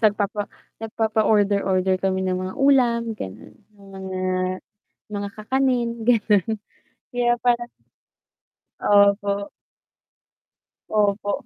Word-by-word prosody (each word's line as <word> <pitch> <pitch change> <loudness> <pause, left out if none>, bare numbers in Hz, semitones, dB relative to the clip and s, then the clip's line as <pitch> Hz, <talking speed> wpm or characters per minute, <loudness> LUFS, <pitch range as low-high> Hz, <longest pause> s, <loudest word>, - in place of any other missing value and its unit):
nagpapa 205 -1 +1 0.3
nagpapa-order, 215 -2 +1
order 185 0 +1
kami 190 0 0
ng 185 -1 0
mga 185 0 -5
ulam, 240 -4 +3
ganon, 100 - -9 0.2
yung 200 -1 -17
mga 190 -1 -6 0.9
mga 205 -1 -4
kakanin, 250 +2 0 0.2
ganon, 220 -2 +2 0.5
kaya 240 0 +2
parang 240 -1 +2 1.1
Opo. 200 0 +3 1.4
Opo, 205 -1 0
205 Hz, 90 wpm, -23 LUFS, 200-230 Hz, 1.4 s, ulam